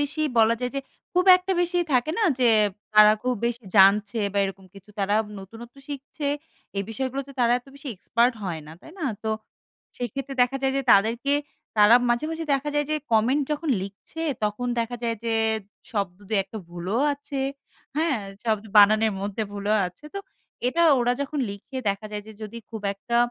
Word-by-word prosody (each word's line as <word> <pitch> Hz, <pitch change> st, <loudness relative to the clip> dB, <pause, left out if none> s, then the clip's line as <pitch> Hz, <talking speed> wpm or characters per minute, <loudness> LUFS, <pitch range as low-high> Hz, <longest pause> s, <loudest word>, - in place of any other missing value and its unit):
বেশি 290 Hz, +2 st, -1 dB, 0.2 s
বলা 225 Hz, +1 st, +5 dB
যায় 250 Hz, -, -1 dB
যে -, -, 0 dB, 0.3 s
খুব 360 Hz, +1 st, +3 dB
একটা 365 Hz, +1 st, -2 dB
বেশি 355 Hz, 0 st, +1 dB
থাকে 255 Hz, +4 st, +2 dB
না? 450 Hz, -, +1 dB, 0.2 s
যে 245 Hz, -2 st, +4 dB, 0.5 s
তারা 215 Hz, 0 st, +9 dB
খুব 250 Hz, 0 st, +1 dB
বেশি 235 Hz, -1 st, -3 dB
জানছে 205 Hz, +3 st, +5 dB
বা 200 Hz, -, 0 dB
এরকম 195 Hz, 0 st, -6 dB
কিছু 195 Hz, +1 st, -15 dB
তারা 200 Hz, +1 st, +1 dB, 0.2 s
নতুনত্ব 225 Hz, +6 st, -11 dB
শিখছে 285 Hz, +1 st, -6 dB, 0.5 s
এই 195 Hz, -, +1 dB
বিষয়গুলাতে 265 Hz, +4 st, -3 dB
তারা 240 Hz, -1 st, +4 dB
এত 250 Hz, -, -23 dB
বেশি 280 Hz, 0 st, -9 dB
এক্সপার্ট 235 Hz, +6 st, +2 dB
হয় 170 Hz, -5 st, -3 dB
না। 155 Hz, -, -10 dB
তাই -, -, -13 dB
না? 325 Hz, -, -3 dB, 0.2 s
তো 220 Hz, -, -1 dB, 0.7 s
সেক্ষেত্রে 270 Hz, +3 st, -4 dB
দেখা 250 Hz, +2 st, +1 dB
যায় 265 Hz, 0 st, +2 dB
যে 275 Hz, -, +1 dB
তাদেরকে 230 Hz, +7 st, +3 dB, 0.4 s
তারা 210 Hz, +2 st, +7 dB
মাঝে, 240 Hz, +4 st, +1 dB
মাঝে 325 Hz, 0 st, -4 dB
দেখা 275 Hz, +2 st, -2 dB
যায় 295 Hz, -1 st, +1 dB
যে 310 Hz, -, +2 dB, 0.2 s
কমেন্ট 245 Hz, +7 st, +3 dB
যখন 300 Hz, +2 st, -3 dB
লিখছে 200 Hz, +11 st, -9 dB, 0.2 s
তখন 210 Hz, +4 st, -2 dB
দেখা 235 Hz, +1 st, -3 dB
যায় 230 Hz, -1 st, -1 dB
যে 225 Hz, -1 st, 0 dB, 0.6 s
শব্দ 200 Hz, -5 st, -2 dB
২-১ 200 Hz, -3 st, +1 dB
টা 220 Hz, -, -4 dB
ভুলও 175 Hz, +6 st, -3 dB
আছে। 280 Hz, -1 st, -5 dB, 0.6 s
হ্যাঁ? 315 Hz, -5 st, +1 dB, 0.3 s
শব্দ 215 Hz, -2 st, 0 dB
বানানের 215 Hz, +1 st, +6 dB
মধ্যে 205 Hz, +2 st, -3 dB
ভুলও 205 Hz, +1 st, 0 dB
আছে। 180 Hz, +11 st, -13 dB
তো -, -, -2 dB, 0.5 s
এটা 335 Hz, +7 st, +1 dB, 0.2 s
ওরা 245 Hz, +1 st, +2 dB
যখন 280 Hz, +2 st, -3 dB
লিখে 200 Hz, +6 st, -9 dB
দেখা 200 Hz, +2 st, -2 dB
যায় 210 Hz, 0 st, -4 dB
যে 220 Hz, -, -10 dB
যদি 215 Hz, +2 st, -6 dB
খুব 220 Hz, -2 st, -7 dB
একটা 235 Hz, +4 st, -2 dB
235 Hz, 185 wpm, -25 LUFS, 205-275 Hz, 0.7 s, তারা